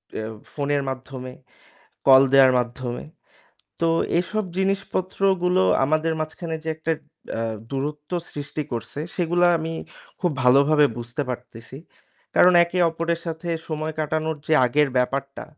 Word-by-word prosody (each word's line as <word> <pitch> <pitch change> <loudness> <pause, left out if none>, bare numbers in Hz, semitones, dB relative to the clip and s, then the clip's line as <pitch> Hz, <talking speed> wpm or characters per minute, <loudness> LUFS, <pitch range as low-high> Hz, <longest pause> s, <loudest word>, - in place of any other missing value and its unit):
অ্যা 110 - -3 0.3
ফোনের 145 -1 0
মাধ্যমে, 130 -1 -7 0.8
কল 135 0 +9
দেওয়ার 135 -1 +7
মাধ্যমে। 120 0 -4 0.8
তো 165 - +3 0.3
এসব 215 +4 -2
জিনিসপত্রগুলো 190 -1 +1 0.2
আমাদের 155 +3 +1
মাঝখানে 160 +1 -4
যে - - -4
একটা 160 +1 -1 0.4
অ্যা 115 - -2 0.3
দূরত্ব 145 +2 -4 0.2
সৃষ্টি 145 +1 -4
করছে 120 +4 -5 0.2
সেগুলা 175 0 +2
আমি 160 +1 -4 0.5
খুব 180 - +1
ভালোভাবে 140 +4 +5
বুঝতে 120 +4 -4
পারতেছি। 120 0 -8 0.6
কারণ 180 - +7
একে 170 +1 -4
অপরের 165 +1 -2
সাথে 165 +1 -5 0.2
সময় 155 0 -3
কাটানোর 155 +1 -1
যে 160 - +3
আগের 145 +4 +2
ব্যাপারটা, 135 +2 -2
155 Hz, 125 wpm, -23 LUFS, 135-165 Hz, 0.8 s, কল